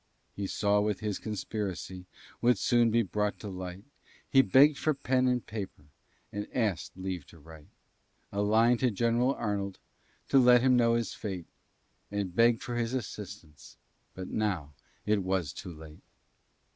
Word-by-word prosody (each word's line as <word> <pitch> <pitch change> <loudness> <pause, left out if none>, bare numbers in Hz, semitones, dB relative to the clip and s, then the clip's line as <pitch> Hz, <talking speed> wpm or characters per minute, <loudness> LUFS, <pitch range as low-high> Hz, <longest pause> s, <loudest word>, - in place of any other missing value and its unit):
He 100 -1 -3
saw 105 +1 +2
that 105 -3 -2
his 105 -2 -2
conspiracy 95 -4 -5 0.3
Would 125 +1 +4
soon 120 -1 +3
be 115 +1 +3
brought 105 +2 -1
to 105 - -6
light; 95 0 -7 0.4
He 135 - +6
begg'd 135 +6 +5
for 155 -2 +1
pen 130 -1 +1
and 125 -1 0
paper, 100 -8 -6 0.5
And 105 +1 -4
askèd 105 -9 -1
leave 95 -4 -5
to - - -16
write 80 -1 -14 0.6
A 100 - -1
line 115 +3 +4
to 130 - +3
General 120 +4 +1
Arnold, 100 -3 -2 0.5
To 135 - +6
let 125 -1 +6
him 130 -1 +5
know 115 -1 +4
his 115 -2 -1
fate, 95 -5 -5 0.6
And 100 -3 -3
beg 115 +1 +4
for 120 -2 -4
his 120 +1 -1
assistance; 100 - -8 0.4
But 95 0 -6
now 90 -9 -2 0.3
it 105 -1 +2
was 95 -5 -1
too 95 - -8
late. 80 -1 -12
105 Hz, 160 wpm, -30 LUFS, 95-120 Hz, 0.6 s, He